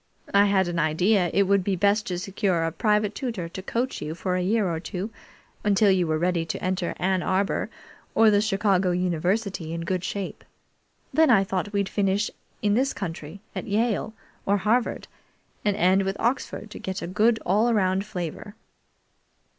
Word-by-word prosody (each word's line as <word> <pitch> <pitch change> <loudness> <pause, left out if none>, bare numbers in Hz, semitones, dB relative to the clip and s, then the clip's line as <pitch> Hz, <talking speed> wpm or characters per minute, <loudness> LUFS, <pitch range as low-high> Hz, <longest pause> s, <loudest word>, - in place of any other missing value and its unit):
I 200 0 +6
had 195 -2 +2
an 175 -1 -2
idea 175 +4 +2
it 200 - +3
would 200 0 +2
be 195 0 0
best 205 +3 +2
to 180 - -2
secure 185 -2 0
a 165 - 0
private 210 +3 +1
tutor 225 -10 -4
to 190 - -7
coach 240 +6 -2
you 155 +2 -4
for 180 +1 -2
a 180 - 0
year 205 +2 +1
or 165 -2 -2
two, 185 +5 -5 0.5
until 205 -1 +4
you 180 -3 +2
were 155 0 +1
ready 175 0 +1
to 165 - -4
enter 185 -1 -1
Ann 185 0 +1
Arbor 195 +2 0 0.5
or 225 -1 +6
the 205 0 +4
Chicago 195 -3 +2
University 180 0 -1
in 165 - -3
good 180 +1 -2
shape. 195 0 -4 0.7
Then 320 0 +5
I 205 -5 +6
thought 195 +1 -3
we'd 200 -2 0
finish 200 +1 0 0.3
in 205 -1 +3
this 265 +5 +1
country 175 -1 -6
at - - -4
Yale 220 +1 0 0.3
or 200 +1 +3
Harvard, 220 +5 0 0.6
and 205 -1 +1
end 190 +1 +4
with 195 0 -2
Oxford, 230 -3 -2
to - - -8
get 190 0 -4
a - - -2
good, 215 +6 +2
all 215 +6 +3
round 190 -3 +2
flavor." 200 0 -6
195 Hz, 180 wpm, -25 LUFS, 180-210 Hz, 0.7 s, I